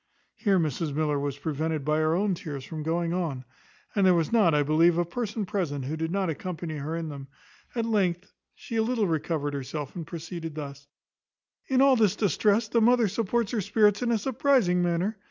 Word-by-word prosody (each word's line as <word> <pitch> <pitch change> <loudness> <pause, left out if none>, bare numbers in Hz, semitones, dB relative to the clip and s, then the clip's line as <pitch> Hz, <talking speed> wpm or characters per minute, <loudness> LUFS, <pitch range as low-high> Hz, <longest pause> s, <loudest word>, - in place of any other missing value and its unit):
Here 200 -4 +1
Mrs 155 -2 -1
Miller 150 -2 +1
was 140 -1 -3
prevented, 155 0 -2
by 150 +1 +2
her 155 +1 +2
own 200 +2 +1
tears, 145 -6 -6
from 155 +1 -6
going 165 +2 -1
on, 155 -8 -2 0.5
and 200 - +3
there 185 -1 +6
was 165 -2 0
not, 205 -9 +4
I 145 - +3
believe, 165 +3 +4
a 175 - +2
person 215 +3 -3
present 155 -9 -2
who 150 +4 -3
did 160 0 -2
not 195 +1 0
accompany 165 0 -4
her 150 +3 -4
in 165 -1 -3
them; 140 -2 -8 0.5
at 230 -2 0
length 195 -5 0 0.2
she 230 - -6
a - - +3
little 225 -1 +1
recovered 155 -3 -1
herself, 140 +1 -5
and 165 -3 -6
proceeded 165 -1 -6
thus: 140 -2 -7 0.8
"In 265 -1 +3
all 275 -1 +6
this 210 -4 +3
distress 210 +2 +2
the 230 +2 +2
mother 240 0 +4
supports 230 +2 -1
her 230 -4 0
spirits 210 +2 +3
in 245 - 0
a 230 - +3
surprizing 240 -6 +2
manner. 175 +5 0
170 Hz, 200 wpm, -27 LUFS, 155-210 Hz, 0.8 s, there